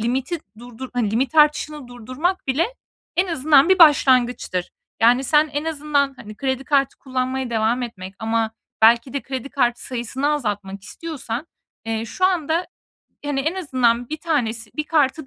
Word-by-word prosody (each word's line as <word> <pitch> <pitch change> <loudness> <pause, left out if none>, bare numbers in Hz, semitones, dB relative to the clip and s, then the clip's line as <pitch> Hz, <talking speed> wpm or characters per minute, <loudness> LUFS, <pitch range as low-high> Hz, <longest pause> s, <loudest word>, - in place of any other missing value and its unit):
limiti 255 +9 -1 0.2
durdur 245 +2 -9
hani, 240 -4 0
limit 255 +7 0
artışını 300 -2 +2
durdurmak 255 +10 -3
bile 275 +6 +1 0.5
en 365 - +3
azından 300 -1 +4
bir 380 - +4
başlangıçtır. 255 - +4 0.3
Yani, 245 +4 +4
sen 300 +3 +3
en 290 +1 -2
azından, 290 -3 0
hani, 215 -4 -11
kredi 265 +1 -2
kartı 275 -1 +1
kullanmaya 260 -1 -3
devam 230 +2 +1
etmek 195 -5 -7
ama 225 0 0 0.3
belki 235 +3 +5
de 280 - -3
kredi 265 0 -5
kartı 245 -4 0
sayısını 255 +2 -2
azaltmak 205 -8 -3
istiyorsan, 285 -1 -6 0.4
eee, 225 0 -2
şu 370 +11 -2
anda, 340 -2 +1 0.6
hani, 285 -2 -1
en 315 +6 -1
azından 245 -9 +1
1 310 - -3
tanesi, 240 -9 -2
1 305 - -1
kartı 300 -2 +1
265 Hz, 155 wpm, -21 LUFS, 235-300 Hz, 0.6 s, belki